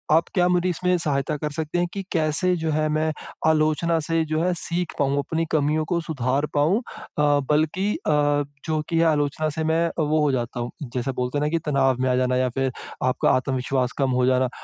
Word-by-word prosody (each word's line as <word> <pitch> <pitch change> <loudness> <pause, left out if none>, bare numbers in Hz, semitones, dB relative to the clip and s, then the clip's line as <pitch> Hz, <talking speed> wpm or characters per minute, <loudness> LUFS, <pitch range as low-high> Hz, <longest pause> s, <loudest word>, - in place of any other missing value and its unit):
आप 165 - +3
क्या 180 -2 +3
मेरी 180 0 +2
इसमें 180 +1 +1
सहायता 150 -2 -1
कर 150 0 -3
सकते 155 +2 -3
हैं 175 - +1
कि 195 -1 -4
कैसे 165 +2 +1
जो 160 -1 -1
है 155 0 +1
मैं 155 +1 +1 0.4
आलोचना 160 +1 +2
से 165 0 +2
जो 155 0 -1
है 180 0 +1
सीख 175 +1 -1
पाऊँगा। 140 0 +2
अपनी 165 +3 -1
कमियों 155 +1 +1
को 170 - +1
सुधार 140 -2 -1
पाऊँ 155 +9 +3
अ, 145 -9 -1
बल्कि 160 +7 +1
अ, - - -2 0.5
जो 155 -1 0
कि 165 -1 +1
है 165 - +4
आलोचना 150 0 +1
से 160 - 0
मैं 165 +1 +2
वो 155 0 +2
हो 150 -2 +2
जाता 120 -1 -2
हूँ। 120 - -3 0.2
जैसा 130 +1 -1
बोलते 125 +3 -1
हैं 150 - 0
न - - 0
कि 165 - +1
तनाव 135 -3 +2
में 130 - +1
आ 125 - +2
जाना 125 0 +1
या 130 0 +1
फिर 135 -1 +1 0.4
आपका 130 - +2
आत्मविश्वास 130 -1 -1
कम 135 -2 +2
हो - - +3
जाना, 130 0 +2
155 Hz, 215 wpm, -23 LUFS, 135-165 Hz, 0.5 s, है